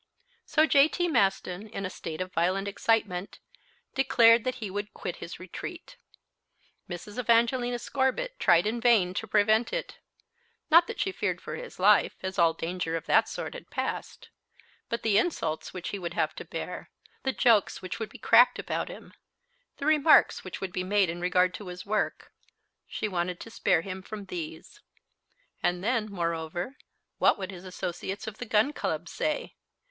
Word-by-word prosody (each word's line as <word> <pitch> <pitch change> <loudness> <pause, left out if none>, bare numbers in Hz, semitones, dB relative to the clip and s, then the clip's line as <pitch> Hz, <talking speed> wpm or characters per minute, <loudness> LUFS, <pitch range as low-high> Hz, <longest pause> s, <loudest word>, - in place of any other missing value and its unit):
So 310 - +4
J.T. 315 +4 +3
Maston, 195 - +1
in 195 -2 -5
a - - -2
state 160 -1 -6
of 185 0 -5
violent 185 +4 +1
excitement, 200 -3 0 0.6
declared 240 -4 +5
that 255 - -1
he 215 -6 -6
would 205 +1 -5
quit 175 - -5
his 170 - -8
retreat. 185 - -8 0.9
Mrs. 190 +6 -7
Evangelina 240 +1 +2
Scorbitt 275 - -1
tried 175 -2 +5
in 230 +2 -1
vain 220 -7 +4
to 220 - -4
prevent 215 +2 +3
it. - - -4 0.7
Not 335 +2 +7
that 465 - -6
she 385 - 0
feared - - -2
for - - -6
his - - -9
life, - - +4
as 190 0 -3
all 165 -1 +5
danger 165 0 -3
of 165 - -8
that - - +4
sort - - -5
had - - -10
passed. - - -4 0.6
But 235 0 -3
the 210 -2 +4
insults 165 - -2
which 185 -1 -5
he 200 - -4
would 175 -2 -5
have - - 0
to - - -7
bear, - - -6 0.3
the 265 - 0
jokes 225 -8 +3
which 185 - -5
would 220 -2 -4
be - - -12
cracked 240 +2 +5
about - - -3
him, - - -11 0.6
the 280 - -5
remarks 310 0 +5
which - - -7
would 190 -2 -4
be 180 - -2
made 195 -2 +2
in 175 +1 -7
regard 180 0 +2
to 205 - -8
his 180 0 -7
work 215 +1 -2 0.6
she 215 - -3
wanted 180 -2 -2
to 230 - -9
spare 175 - +2
him 190 +1 -6
from 205 +1 -8
these. 170 - -7 0.8
And 175 +1 0
then, 230 -1 +1
moreover, 170 - -3 0.4
what - - +4
would 190 -1 -5
his 185 0 -10
associates 185 +2 -5
of 220 -1 -7
the 245 - -4
Gun 220 +7 +3
Club - - -3
say? - - -2
205 Hz, 175 wpm, -28 LUFS, 180-245 Hz, 0.9 s, Not